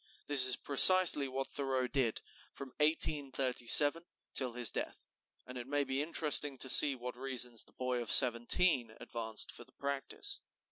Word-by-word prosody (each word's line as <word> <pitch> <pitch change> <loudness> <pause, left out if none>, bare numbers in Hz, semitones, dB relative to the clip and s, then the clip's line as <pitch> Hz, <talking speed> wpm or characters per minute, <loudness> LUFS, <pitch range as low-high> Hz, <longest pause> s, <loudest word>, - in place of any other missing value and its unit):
This 135 -3 +4
is 130 - +5
precisely 155 0 +5
what 135 +1 -8
Thoreau 135 -2 -6
did 125 -4 -5 0.3
from 140 - -13
1837 145 -1 +1 0.3
till 125 -3 -5
his 120 -1 -1
death; - - -10 0.4
and 125 0 -13
it 120 - -12
may 145 +1 -4
be 135 0 -7
interesting 150 -3 0
to 130 - 0
see 140 +1 +4
what 125 0 -11
reasons 125 -3 -3
the - - -20
boy 125 -1 -7
of 115 - -5
seventeen 120 0 +3
advanced 110 -2 -3
for - - -12
the - - -25
practice. 140 - -7
135 Hz, 155 wpm, -29 LUFS, 125-145 Hz, 0.4 s, is